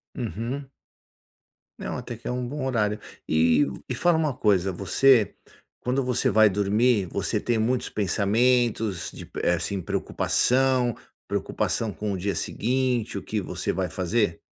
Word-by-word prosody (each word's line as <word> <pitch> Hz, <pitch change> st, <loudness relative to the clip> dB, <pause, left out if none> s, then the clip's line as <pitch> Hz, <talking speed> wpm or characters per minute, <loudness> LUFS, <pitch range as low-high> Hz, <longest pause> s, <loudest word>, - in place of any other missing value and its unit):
Uhum. 120 Hz, -, -4 dB, 1.1 s
Não, -, -, -4 dB
até 120 Hz, -, -6 dB
que -, -, -10 dB
é -, -, -1 dB
um 125 Hz, -1 st, -2 dB
bom 140 Hz, 0 st, -4 dB
horário. 105 Hz, -4 st, 0 dB, 0.3 s
E 80 Hz, -, +4 dB, 0.2 s
e -, -, -1 dB
fala 175 Hz, -2 st, +3 dB
uma 155 Hz, -4 st, +1 dB
coisa, 95 Hz, -4 st, +2 dB
você 110 Hz, +4 st, +3 dB, 0.5 s
quando 130 Hz, +2 st, 0 dB
você 125 Hz, -1 st, +1 dB
vai 110 Hz, +1 st, +6 dB
dormir 105 Hz, +1 st, +2 dB
você -, -, -1 dB
tem 120 Hz, -2 st, 0 dB
muitos 120 Hz, +3 st, 0 dB
pensamentos 110 Hz, 0 st, +1 dB
de, -, -, -10 dB
eh, 90 Hz, -, +3 dB
assim 90 Hz, +4 st, -2 dB
de -, -, -9 dB
preocupação, 130 Hz, -2 st, +1 dB, 0.3 s
preocupação 110 Hz, -2 st, -1 dB
com 105 Hz, 0 st, -4 dB
o 95 Hz, -, -2 dB
dia 100 Hz, +2 st, -2 dB
seguinte, 125 Hz, -1 st, -1 dB
o -, -, -5 dB
que 105 Hz, -2 st, -2 dB
você 90 Hz, -1 st, -3 dB
vai 95 Hz, -2 st, -1 dB
fazer? 95 Hz, -1 st, 0 dB
110 Hz, 155 wpm, -25 LUFS, 100-125 Hz, 1.1 s, vai